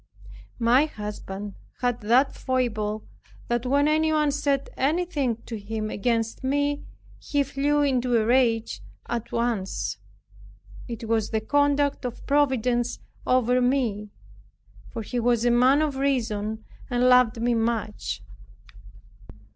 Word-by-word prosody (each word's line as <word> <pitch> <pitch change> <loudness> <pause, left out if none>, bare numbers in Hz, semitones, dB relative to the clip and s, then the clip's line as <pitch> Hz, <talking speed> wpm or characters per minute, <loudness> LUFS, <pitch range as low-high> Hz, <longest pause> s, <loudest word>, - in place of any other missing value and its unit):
My 245 +5 +4
husband 210 -5 -6 0.3
had 245 -2 0
that 245 +6 +3
foible, 220 -5 -2 0.4
that 240 +1 0
when 285 +3 +3
anyone 310 -1 +2
said 275 -1 -1
anything 285 -5 0
to 225 -2 -6
him 215 +1 -4
against 230 +2 -1
me, 285 +2 0 0.4
he 285 -1 0
flew 285 +2 +1
into 250 -4 +2
a 215 - 0
rage 230 - +2 0.3
at 235 -2 -4
once. 230 -5 -2 0.9
It 230 -1 -6
was 220 -1 +1
the 220 - 0
conduct 285 +4 +1
of 245 -2 -6
providence 255 -4 +1 0.3
over 255 0 +3
me; 240 -5 0 0.8
for 225 - -5
he 245 +3 -3
was 240 0 +2
a 240 - +4
man 260 +5 +4
of 290 -3 -2
reason 220 -6 -1 0.2
and 245 0 +2
loved 250 -3 +5
me 240 +1 +1
much. 215 - -2
245 Hz, 125 wpm, -25 LUFS, 225-275 Hz, 0.9 s, loved